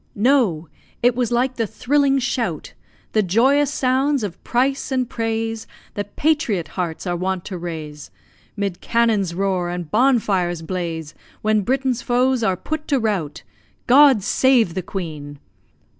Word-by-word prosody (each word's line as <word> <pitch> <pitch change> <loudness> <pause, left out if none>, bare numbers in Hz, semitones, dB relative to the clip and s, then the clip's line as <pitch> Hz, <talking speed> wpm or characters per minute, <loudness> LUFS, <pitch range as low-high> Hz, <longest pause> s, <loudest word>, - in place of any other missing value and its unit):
No! 210 - +2 0.4
it 245 0 +5
was 245 -2 -1
like 250 +2 0
the 225 -2 0
thrilling 275 +5 +1
shout 235 - -2 0.4
The 215 - +3
joyous 260 +9 +3
sounds 270 0 +1
of 190 -4 -6
price 270 +3 0
and 255 -2 0
praise 225 -1 -3 0.3
That 205 0 -6
patriot 285 - 0
hearts 175 -2 -4
are 175 -1 -1
wont 185 0 -2
to 190 - -5
raise, 155 -4 -7 0.5
'Mid 200 -3 -3
cannon's 220 -7 +1
roar 185 -2 0
and 175 -3 -5
bonfires 205 -9 +2
blaze, 165 -3 -4 0.3
When 215 0 +2
Britain's 255 +2 0
foes 250 +1 +1
are 190 -5 +1
put 310 - -5
to 280 - +2
rout 195 -10 -2 0.4
God 265 -4 +6
save 240 -4 +3
the 185 - -2
Queen! 155 -6 -6
220 Hz, 145 wpm, -21 LUFS, 180-255 Hz, 0.5 s, God